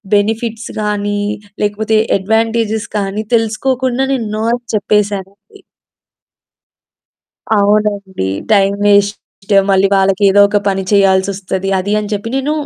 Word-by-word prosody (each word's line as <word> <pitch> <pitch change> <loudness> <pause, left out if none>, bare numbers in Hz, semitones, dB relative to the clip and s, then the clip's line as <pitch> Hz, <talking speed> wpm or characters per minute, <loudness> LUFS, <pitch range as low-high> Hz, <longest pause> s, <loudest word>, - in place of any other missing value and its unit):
Benefits 225 +2 -1
గాని, 205 -1 -1 0.4
లేకపోతే 215 +1 0 0.2
advantages 220 +1 0
కానీ 205 +1 -2
తెలుసుకోకుండా 255 +3 0
నేను 230 -5 -2
నో 220 - -2
అని 245 0 -3
చెప్పేసానండి. 205 - -2 2.0
అవునండి. 200 - 0 0.2
టైమ్ 200 0 +3
వేస్ట్ 205 0 +3 0.5
మళ్ళీ 195 0 +3
వాళ్ళకేదో 195 +1 +3
ఒక 205 0 +1
పని 195 0 -1
చేయాల్సొస్తది 195 -1 +1
అది 200 +3 -2
అని 210 -1 -4
చెప్పి 205 +2 -3
నేను 270 +3 -1
205 Hz, 105 wpm, -14 LUFS, 195-220 Hz, 2.0 s, టైమ్